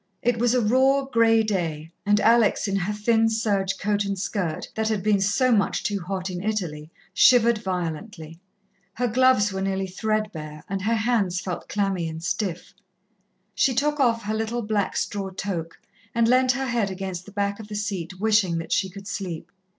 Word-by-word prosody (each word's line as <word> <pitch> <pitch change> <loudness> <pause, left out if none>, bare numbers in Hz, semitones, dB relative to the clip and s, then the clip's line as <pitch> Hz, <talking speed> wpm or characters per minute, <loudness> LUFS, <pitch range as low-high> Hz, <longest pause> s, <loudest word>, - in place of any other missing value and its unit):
It 240 -1 +1
was 240 +1 +2
a 250 - +3
raw, 265 +5 +3
grey 225 -3 +3
day, 165 -7 -2 0.2
and 205 0 +4
Alex, 225 -1 +3
in 195 - -1
her 195 +1 -1
thin 225 +2 +2
serge 200 -4 0
coat 205 +1 0
and 200 0 -3
skirt, 185 -4 -3
that 220 0 -1
had 215 -3 -1
been 205 -2 +2
so 250 +6 +2
much 205 -4 +1
too 205 -1 -1
hot 185 +1 -4
in 175 0 -5
Italy, 175 -8 -3 0.2
shivered 235 -3 +5
violently. 170 -3 -5 0.6
Her 245 +1 0
gloves 240 -4 +3
were 190 - -3
nearly 195 0 -1
thread 215 +3 -1
bare 150 -2 -8
and 195 0 -3
her 225 +4 +1
hands 220 -6 +1
felt 180 -2 -5
clammy 195 -5 -1
and 160 +1 -7
stiff. 180 -1 -3 0.8
She 260 - +2
took 295 +3 +1
off 230 -4 +2
her 210 +1 -2
little 225 +2 -2
black 210 -2 -1
straw 200 -2 -2
toque 185 -3 -5 0.4
and 230 -1 +3
leant 255 +1 +4
her 270 +1 -2
head 235 -5 0
against 190 -1 -5
the - - -10
back 200 0 -2
of 220 - -9
the 210 - -7
seat, 190 -4 -4
wishing 210 -5 +2
that 165 - -6
she 190 - +1
could 195 +2 -11
sleep. 180 -7 -5
205 Hz, 190 wpm, -24 LUFS, 185-225 Hz, 0.8 s, shivered